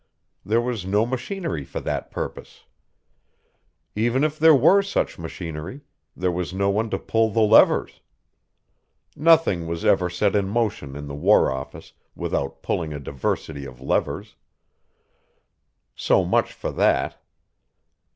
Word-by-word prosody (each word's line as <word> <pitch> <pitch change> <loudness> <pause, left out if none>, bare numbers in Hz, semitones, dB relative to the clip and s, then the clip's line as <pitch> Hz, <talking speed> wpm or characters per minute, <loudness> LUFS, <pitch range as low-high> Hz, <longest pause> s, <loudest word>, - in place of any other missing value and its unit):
There 115 +3 +1
was 120 -5 -3
no 105 +4 +1
machinery 130 - -4
for - - -6
that - - -3
purpose. - - -7 1.3
Even 120 +6 +1
if 155 0 -1
there 160 0 +7
were 165 +9 +5
such 200 - -2
machinery, 85 - -7 0.3
there 90 0 0
was 90 +1 -4
no 100 +1 +1
one 110 +3 -1
to - - -1
pull 115 0 +1
the 110 +1 +1
levers. 110 +1 +4 1.1
Nothing 155 - +3
was 85 0 -4
ever 90 -1 +3
set 95 +3 0
in 100 -2 +1
motion 100 - -2
in 75 0 -7
the 70 - -7
War 85 +2 +3
Office 65 0 -8 0.2
without 70 - -3
pulling 80 -3 -2
a 75 - -5
diversity 70 +1 -4
of 65 -2 -10
levers. 65 - -2 1.6
So - - +2
much - - +1
for - - -5
that. - - +1
100 Hz, 135 wpm, -23 LUFS, 80-120 Hz, 1.6 s, there